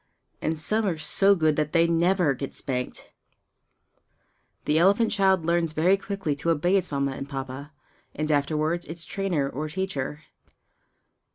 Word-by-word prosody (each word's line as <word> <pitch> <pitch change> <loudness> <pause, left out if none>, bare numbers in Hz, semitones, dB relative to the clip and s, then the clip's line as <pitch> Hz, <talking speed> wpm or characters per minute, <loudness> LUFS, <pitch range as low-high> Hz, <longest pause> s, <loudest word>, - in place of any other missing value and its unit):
And 160 - -1
some 215 +7 0
are 170 -4 -1
so 195 +6 +3
good 155 -4 +2
that 150 -1 -1
they 165 -1 +5
never 170 -1 +2
get 135 +1 -6
spanked! 125 -2 -4 1.5
The 155 +1 +2
elephant 200 +6 +4
child 190 -4 +2
learns 170 -1 +1
very 175 +5 +3
quickly 195 -6 -3
to 165 - -2
obey 165 +4 +2
its 190 -5 0
Mamma 140 -1 0
and 135 +1 -7
Papa, 135 +1 -6 0.4
and 155 0 -1
afterwards 155 +4 0
its 165 +1 -6
trainer 180 -8 -1
or 150 +3 -4
teacher. 150 -4 -4
160 Hz, 150 wpm, -26 LUFS, 145-185 Hz, 1.5 s, they